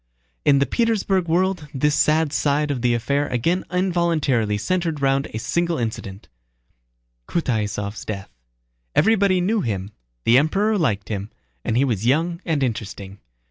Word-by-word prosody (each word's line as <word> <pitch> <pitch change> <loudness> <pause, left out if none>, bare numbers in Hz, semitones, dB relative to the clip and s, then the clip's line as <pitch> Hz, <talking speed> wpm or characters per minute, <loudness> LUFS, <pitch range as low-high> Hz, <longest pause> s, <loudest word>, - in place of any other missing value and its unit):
In 140 -1 +5
the 140 - +3
Petersburg 200 - +1
world 180 -1 0
this 150 +3 +2
sad 155 0 +2
side 145 0 +1
of 130 -4 -2
the 120 -1 +2
affair 140 +5 0
again 165 +10 0
involuntarily 165 - +1
centered 165 - -1
round 135 0 +1
a - - -6
single 170 +8 0
incident: 110 -4 -5 1.0
Kutáysov's 105 -8 -2
death. 100 -2 -6 0.6
Everybody 200 -4 +3
knew 210 +4 +1
him, 100 - -3 0.3
the 120 +3 +6
Emperor 200 +9 +1
liked 105 - 0
him, 100 -1 -4 0.3
and 115 - 0
he 135 - +4
was 115 -4 -1
young 170 +6 +1
and 155 -5 0
interesting. 100 -4 -4
140 Hz, 140 wpm, -22 LUFS, 110-170 Hz, 1.0 s, the